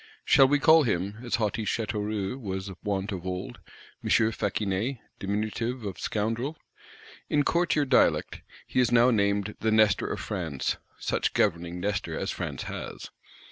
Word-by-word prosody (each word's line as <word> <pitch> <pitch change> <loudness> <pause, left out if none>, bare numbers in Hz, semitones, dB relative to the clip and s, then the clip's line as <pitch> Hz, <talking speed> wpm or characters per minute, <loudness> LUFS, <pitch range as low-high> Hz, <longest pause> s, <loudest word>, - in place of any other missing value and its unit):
Shall 135 - +6
we 145 +2 +3
call 160 +3 +6
him, 100 - -1
as 120 - 0
haughty 110 0 -1
Châteauroux 105 +1 -2
was 95 -2 -4
wont 100 0 -1
of 90 -3 -5
old, 90 -9 -5 0.4
"M. - - -3 0.2
Faquinet 105 +4 -1 0.2
(Diminutive 110 +4 -2
of 100 - -5
Scoundrel)"? 115 +8 -2 0.7
In 145 -1 +3
courtier 170 -2 +2
dialect, 130 -2 +2 0.2
he - - -1
is 125 - +3
now 120 +1 +6
named 100 -1 +1
"the 110 - +1
Nestor 110 -2 +4
of - - -3
France;" 85 -10 -2 0.2
such - - -1
governing 85 +1 +1
Nestor 100 +3 -2
as - - -2
France - - -4
has. - - -7
105 Hz, 145 wpm, -27 LUFS, 100-120 Hz, 0.7 s, Shall